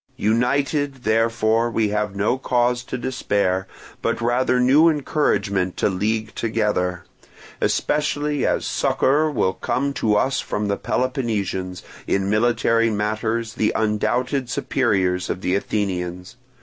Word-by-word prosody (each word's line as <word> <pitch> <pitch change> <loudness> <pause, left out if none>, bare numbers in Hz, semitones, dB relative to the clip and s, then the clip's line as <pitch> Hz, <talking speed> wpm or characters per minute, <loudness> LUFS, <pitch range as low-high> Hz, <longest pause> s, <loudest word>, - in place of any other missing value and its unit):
"United, 135 +4 0
therefore, 115 +1 +2
we 110 -2 0
have 105 -1 -2
no 105 +5 +1
cause 125 -2 0
to 125 - -5
despair, 100 -7 -1 0.3
but - - -1
rather 125 +2 +1
new 140 +7 +5
encouragement 100 - 0
to - - +2
league 110 +3 -1
together; 105 -6 -1 0.6
especially 150 -1 0
as - - 0
succour 150 +4 +2
will 105 -10 0
come 140 +7 -1
to 110 -5 +1
us 130 +6 +1
from 105 0 -2
the 100 - +1
Peloponnesians, 100 -8 -2 0.2
in 100 0 0
military 115 +1 +2
matters 110 +2 -1
the 110 - +1
undoubted 120 +5 0
superiors 95 -9 0
of 90 - -3
the 90 - 0
Athenians. 90 -2 -2
110 Hz, 125 wpm, -22 LUFS, 100-125 Hz, 0.6 s, new